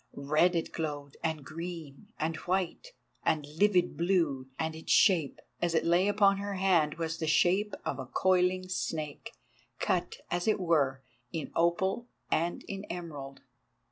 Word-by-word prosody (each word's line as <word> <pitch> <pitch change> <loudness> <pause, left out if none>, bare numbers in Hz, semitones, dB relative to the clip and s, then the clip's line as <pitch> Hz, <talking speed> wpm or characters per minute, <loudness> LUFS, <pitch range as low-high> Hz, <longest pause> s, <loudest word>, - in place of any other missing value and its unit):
Red 155 +6 +2
it 165 - -1
glowed 145 -3 -4
and 160 -4 -2
green, 165 +2 -7
and 160 +1 0
white, 185 - -2 0.3
and 155 -2 +1
livid 180 +4 +2
blue, 165 -7 +1
and 160 0 -2
its 160 - -5
shape, 170 -9 +4 0.2
as 170 -1 +1
it - - +2
lay 175 +3 +4
upon 200 -1 +4
her 200 0 -3
hand, 180 -6 +3
was 165 -1 -3
the 160 - -2
shape 185 +6 +3
of 140 - -2
a 130 - -5
coiling 185 +5 +2
snake, 155 -5 -4 0.4
cut, - - 0 0.2
as 175 +2 -1
it 215 - +3
were, 140 -7 +1 0.3
in 165 -4 -4
opal 190 +7 +1 0.2
and 170 +2 0
in 195 0 -5
emerald. 145 -6 -7
170 Hz, 150 wpm, -30 LUFS, 155-185 Hz, 0.4 s, shape